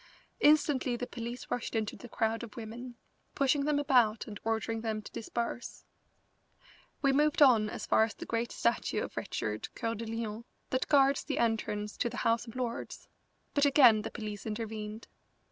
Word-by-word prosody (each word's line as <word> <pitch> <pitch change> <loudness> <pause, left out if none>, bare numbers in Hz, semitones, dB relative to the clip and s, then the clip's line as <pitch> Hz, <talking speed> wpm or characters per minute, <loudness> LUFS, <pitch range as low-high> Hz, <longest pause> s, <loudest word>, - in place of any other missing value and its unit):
Instantly 295 -4 +4
the 245 - -3
police 240 0 -6
rushed 245 -1 -2
into 220 -1 -1
the 245 - -11
crowd 225 0 0
of 235 -3 -9
women, 240 +2 -7 0.4
pushing 280 0 +2
them 300 -1 +2
about 245 -7 +3
and 210 -2 -8
ordering 225 0 -1
them 220 -1 -2
to 210 - -10
disperse. 235 +1 -4 1.2
We 275 -1 +4
moved 300 +2 +3
on 235 -7 +6
as - - -5
far - - +4
as 220 - -8
the - - -7
great 230 +1 -2
statue 235 - 0
of - - -7
Richard 110 0 -3
Coeur 230 -2 -2
de 230 +1 -6
Lion 225 0 -4 0.3
that 255 - 0
guards 275 -1 +4
the - - -3
entrance 210 -2 -1
to 235 - 0
the 245 - -7
House 230 +1 +2
of 230 - -10
Lords, 245 -2 -4 0.5
but 285 - +2
again 255 -6 +7
the 215 - -4
police 210 -1 -6
intervened. 215 0 -5
230 Hz, 175 wpm, -31 LUFS, 220-255 Hz, 1.2 s, again